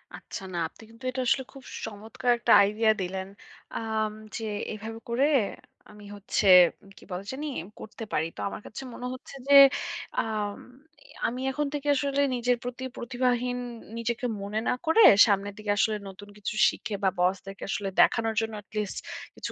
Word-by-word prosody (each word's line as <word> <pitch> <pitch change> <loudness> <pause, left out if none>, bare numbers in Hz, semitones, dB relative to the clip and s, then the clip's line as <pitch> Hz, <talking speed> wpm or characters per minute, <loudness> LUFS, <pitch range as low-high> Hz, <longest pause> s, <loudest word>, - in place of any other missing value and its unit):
আচ্ছা, - - -8
না - - -3
আপনি - - -18
কিন্তু 230 +2 -17
এটা 260 0 -2
আসলে 270 +1 +2
খুব 270 -2 -12 0.2
চমত্কার 220 +3 -2
একটা 240 - 0
আইডিয়া 215 +2 +3
দিলেন। 190 +1 -3 0.5
আম 220 -1 -1 0.2
যে, 225 - -4 0.3
এভাবে 220 +2 -7
করে 250 +4 +2 0.7
আমি 210 -1 -13
হচ্ছে 205 0 -1 0.5
কি - - -15
বলে 180 +2 -4
জানি? 290 +3 -4 0.3
করতে 220 +1 -8
পারি। 155 - +1
তো - - -12
আমার - - -7
কাছে 225 - -8
মনে 245 - -7
হচ্ছে 255 +2 -11
যে 280 - +4 0.7
আম 210 -2 -2 0.5
এ - - -20 0.2
আমি 250 +2 -4
এখন 295 +2 -1
থেকে 290 0 -4
আসলে 280 +1 0
নিজের 245 0 +1
প্রতি 245 +1 -5
প্রতিভাহীন 245 0 0 0.4
নিজেকে 235 +1 -2 0.2
মনে 205 +2 -2
না - - +3
করে, 325 +8 +5 0.2
সামনের 200 -1 0
দিকে 210 -1 -2
আসলে 215 +1 +2
নতুন 205 +2 -12
কিছু 205 - -4 0.2
শিখে 210 - -5
বা 190 - +5
বসদেরকে 195 +2 -1
আসলে 195 0 -2
দেখানোর 225 -1 +3
জন্য 225 0 -3
at - - -54
least 210 -2 -2 0.4
কিছু - - -5
225 Hz, 170 wpm, -27 LUFS, 205-250 Hz, 0.7 s, করে